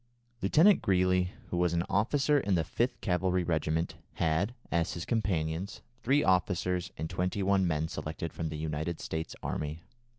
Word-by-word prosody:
Lieutenant 165 - +5
Greely, 90 -1 +2 0.2
who 90 - -1
was 90 -1 +2
an 85 0 +1
officer 140 +7 +2
in 100 -7 +1
the 80 - +2
5th 120 +9 -1
Cavalry 90 -1 +1
regiment, 80 -1 -1 0.2
had, 85 +8 0 0.2
as 85 -1 +1
his 85 - -5
companions, 90 -5 -1 0.2
three 140 +4 +3
officers 90 -1 +1
and 80 - -3
twenty 90 +3 -1
one 95 -1 +3
men 80 -1 0
selected 80 +1 -5
from 80 -1 -3
the 75 - -5
United 80 +2 -3
States 80 0 -4
army. 75 +2 -3
90 Hz, 160 wpm, -30 LUFS, 80-95 Hz, 0.2 s, Lieutenant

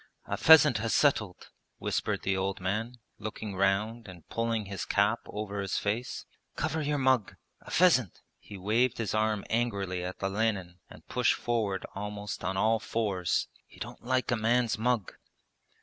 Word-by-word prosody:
'A - - -2
pheasant 150 -7 +7
has 115 +1 0
settled,' 110 -11 +1 0.3
whispered - - -2
the 95 - +1
old 95 +1 -1
man, 105 +6 -2 0.2
looking 110 -2 -5
round 105 +4 0
and 90 -3 -12
pulling 115 -2 -1
his 100 0 -5
cap 105 +3 +2
over 105 -1 -4
his 100 0 -2
face 110 +4 -2 0.3
'Cover 160 - -1
your 145 0 0
mug! 130 -6 +2 0.3
A - - -13
pheasant!' 140 - +3 0.2
he 100 - -10
waved 115 +6 +1
his 115 -4 -2
arm 110 -1 +1
angrily 100 -6 -1
at 90 +2 -6
Olenin 95 -3 -1
and 80 - -15
pushed 120 0 +2
forward 110 -5 -1
almost 105 0 -5
on 95 0 -1
all 110 +3 +3
fours. 100 -6 -1 0.2
'He - - -18
don't - - -8
like 130 +1 0
a - - +3
man's 120 +1 +2
mug.' 115 -3 0
110 Hz, 160 wpm, -29 LUFS, 100-120 Hz, 0.3 s, pheasant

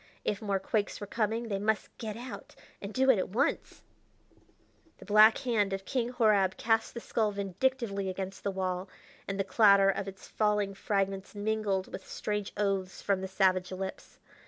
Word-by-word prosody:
If 205 - -1
more 200 -2 0
quakes 205 +2 -1
were 205 - -5
coming 225 +2 -1
they 200 -3 -2
must 215 +1 -1
get 220 -1 -5
out, 250 +2 -9 0.3
and 200 - -6
do 265 +3 +4
it 225 - +2
at - - -2
once 220 +7 -1 1.1
The - - -13
black 215 +2 +7
hand 220 -7 0
of 195 0 -4
King 245 +1 -1
Horab 215 -6 +3
cast 225 +1 +1
the - - -3
skull 220 -2 0
vindictively 200 +1 -1
against 190 +1 -5
the 200 - 0
wall, 185 -1 -2 0.4
and 195 0 -3
the - - +3
clatter 200 0 +5
of 195 +1 -4
its 195 -1 -9
falling 210 -2 +1
fragments 195 0 -2
mingled 205 -2 -1
with 190 - -8
strange 210 -1 -3
oaths 195 -2 -1
from 195 -2 +1
the 190 - -3
savage 185 -1 +2
lips. 190 +1 -6
200 Hz, 175 wpm, -30 LUFS, 195-220 Hz, 1.1 s, black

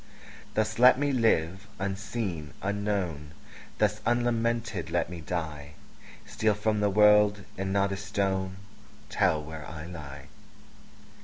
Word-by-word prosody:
Thus 110 +1 0
let 125 +1 +8
me 145 +1 +1
live, 100 -6 +1
unseen, 95 -5 -4
unknown; 100 -7 -2 0.4
Thus 105 0 +1
unlamented 115 -3 0
let 85 +1 -1
me 85 -2 -7
die; 75 -3 -5 0.5
Steal 110 -1 +1
from 105 +1 0
the 105 0 +2
world, 105 0 +5
and 95 0 -3
not 100 0 +2
a 95 - -2
stone 95 -1 -2 0.5
Tell 75 -1 +2
where 80 0 -8
I 80 -1 -7
lie. 75 -6 -9
100 Hz, 125 wpm, -28 LUFS, 85-105 Hz, 0.5 s, let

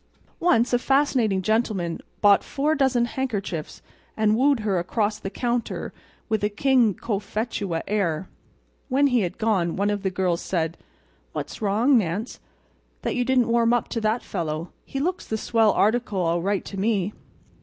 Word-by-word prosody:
Once 245 -8 +3
a 245 - +4
fascinating 250 -8 +2
gentleman 210 -6 0 0.2
bought 205 -1 +6
four 295 +2 0
dozen 265 -5 +2
handkerchiefs, 205 - -4 0.3
and 215 -1 +3
wooed 270 0 +3
her 200 -4 +1
across 210 +4 -1
the 195 - -5
counter 240 +2 -2 0.3
with 220 -2 -1
a 205 - +2
King 235 -1 +3
Cophetua 205 -4 -3
air. 190 -5 0 0.6
When 275 +2 +3
he 250 -3 +3
had 180 -3 -3
gone 200 -7 +1
one 200 +1 +1
of 205 -1 -2
the 190 - 0
girls 180 -2 0
said: 165 -2 -1 0.6
"What's - - -5
wrong, 225 +6 +3
Nance, 200 +5 -3 0.6
that - - -1
you 245 - +1
didn't 250 -2 +2
warm 235 0 +3
up 240 - 0
to 230 - -2
that 220 +2 0
fellow. 165 -2 -4
He 270 - -4
looks 355 +6 -2
the 220 - -1
swell 225 -1 +3
article, 215 -2 +1
all 170 0 +1
right, 200 +2 -1
to 195 - -6
me." 205 -1 0
215 Hz, 165 wpm, -24 LUFS, 190-245 Hz, 0.6 s, bought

